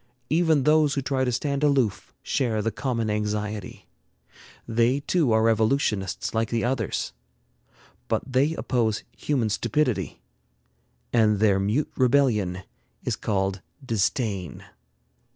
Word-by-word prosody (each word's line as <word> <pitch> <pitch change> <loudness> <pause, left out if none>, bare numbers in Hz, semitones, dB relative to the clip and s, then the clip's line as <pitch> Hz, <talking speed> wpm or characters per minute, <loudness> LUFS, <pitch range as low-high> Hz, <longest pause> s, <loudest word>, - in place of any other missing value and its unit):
Even 160 -3 +3
those 150 0 +4
who 140 - 0
try 130 0 0
to 125 - +1
stand 140 +4 -1
aloof 135 -9 +1
share 110 -5 0
the 115 - 0
common 120 -4 -2
anxiety. 105 -1 -3 0.8
They 120 +4 +2
too 155 -4 +1
are 110 0 +3
revolutionists 110 -2 +1
like 115 0 0
the 115 -1 -1
others, 120 - -1 0.9
but - - 0
they 140 +4 +1
oppose 115 -7 0
human 130 -7 0
stupidity, 120 +4 -1 0.9
and 110 -3 +4
their 100 -2 +3
mute 105 +10 0
rebellion 120 -9 +2 0.4
is - - -1
called 95 -2 -1 0.2
disdain. 105 - -1
115 Hz, 115 wpm, -25 LUFS, 105-135 Hz, 0.9 s, those